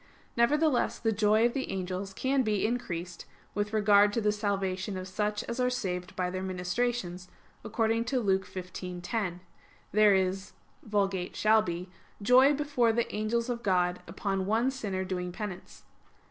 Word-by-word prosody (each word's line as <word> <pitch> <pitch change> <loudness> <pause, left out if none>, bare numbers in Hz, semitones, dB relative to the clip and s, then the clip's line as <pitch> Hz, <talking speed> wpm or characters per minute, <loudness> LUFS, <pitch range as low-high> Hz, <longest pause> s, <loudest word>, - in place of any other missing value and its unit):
Nevertheless 290 +3 +2
the 225 - 0
joy 215 +1 +3
of 240 - +2
the 265 - -3
angels 190 +1 -3
can 265 +6 +1
be 215 -5 +1
increased 180 -7 -3 0.3
with 205 +1 -1
regard 205 -1 +5
to 230 - +1
the 210 -1 +2
salvation 195 -2 -2
of 185 0 -5
such 210 +2 -2
as 235 +2 -5
are 250 0 +3
saved 185 -7 -3
by 180 -1 -1
their 185 0 -3
ministrations, 185 0 -2 0.3
according 225 +1 0
to 255 +2 0
Luke 190 -4 +1
15:10: 180 +1 -4 0.5
"There 210 0 +5
is 190 +1 -1 0.3
[Vulg.'shall 205 +1 +2
be'] 175 -2 -4 0.3
joy 255 +7 +6
before 275 -5 +2
the 235 +1 -1
angels 225 +3 0
of 240 -1 -3
God 180 -3 +1
upon 195 +2 -2
one 230 +5 +2
sinner 200 -8 -3
doing 180 -1 -3
penance." 200 -1 -7
205 Hz, 150 wpm, -29 LUFS, 185-230 Hz, 0.5 s, joy